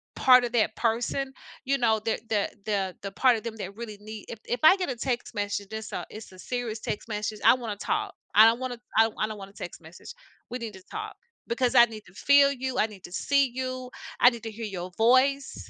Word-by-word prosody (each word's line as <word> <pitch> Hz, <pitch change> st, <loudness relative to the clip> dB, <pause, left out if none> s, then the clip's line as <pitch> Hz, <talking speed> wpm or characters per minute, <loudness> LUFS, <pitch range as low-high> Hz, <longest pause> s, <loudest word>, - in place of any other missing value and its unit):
part 255 Hz, -1 st, +6 dB
of 235 Hz, -, -4 dB
that 220 Hz, -2 st, +2 dB
person, 245 Hz, +4 st, -1 dB, 0.3 s
you 275 Hz, +1 st, +1 dB
know, 225 Hz, -3 st, +2 dB
the 225 Hz, -, +1 dB
the 210 Hz, -2 st, +1 dB, 0.2 s
the 195 Hz, -3 st, -1 dB
the 195 Hz, 0 st, -5 dB
part 250 Hz, +3 st, +4 dB
of 220 Hz, -, -8 dB
them 230 Hz, -1 st, -5 dB
that 200 Hz, 0 st, -7 dB
really 220 Hz, -3 st, -7 dB
need 215 Hz, 0 st, -9 dB
if 230 Hz, -, -7 dB
if 245 Hz, -, -2 dB
I 370 Hz, +5 st, +8 dB
get 365 Hz, -6 st, -2 dB
a 255 Hz, -, -2 dB
text 245 Hz, 0 st, -3 dB
message 205 Hz, -1 st, -2 dB
it's 220 Hz, 0 st, -6 dB
a -, -, -4 dB
it's 215 Hz, -2 st, -10 dB
a 185 Hz, -, -15 dB
serious 240 Hz, -2 st, -4 dB
text 215 Hz, +2 st, -5 dB
message, 210 Hz, 0 st, -3 dB
I -, -, +9 dB
wanna 230 Hz, -5 st, -5 dB
talk, -, -, -2 dB, 0.2 s
I 215 Hz, +1 st, +9 dB
don't 230 Hz, +2 st, +4 dB
wanna 250 Hz, -2 st, -4 dB, 0.2 s
I 225 Hz, 0 st, +6 dB
I 215 Hz, -, +1 dB
don't 215 Hz, -1 st, -7 dB
wanna 195 Hz, 0 st, -10 dB
text 180 Hz, -3 st, -8 dB
message. 165 Hz, -, -12 dB, 0.4 s
We 250 Hz, -, -4 dB
need 225 Hz, -3 st, -6 dB
to 190 Hz, -1 st, -13 dB
talk 430 Hz, 0 st, -6 dB, 0.3 s
because 245 Hz, +1 st, 0 dB
I 240 Hz, -1 st, +9 dB
need 220 Hz, -2 st, -10 dB
to 185 Hz, -, -17 dB
feel 280 Hz, +4 st, +5 dB
you, 260 Hz, 0 st, -4 dB
I -, -, +4 dB
need 200 Hz, -4 st, -14 dB
to 175 Hz, -, -12 dB
see 280 Hz, +5 st, +1 dB
you, 255 Hz, 0 st, -4 dB, 0.3 s
I 245 Hz, -, +9 dB
need 235 Hz, -2 st, -9 dB
to 225 Hz, -, -5 dB
hear 225 Hz, +1 st, -6 dB
your 185 Hz, -3 st, -6 dB
voice. 260 Hz, +4 st, +2 dB
230 Hz, 240 wpm, -27 LUFS, 210-255 Hz, 0.4 s, I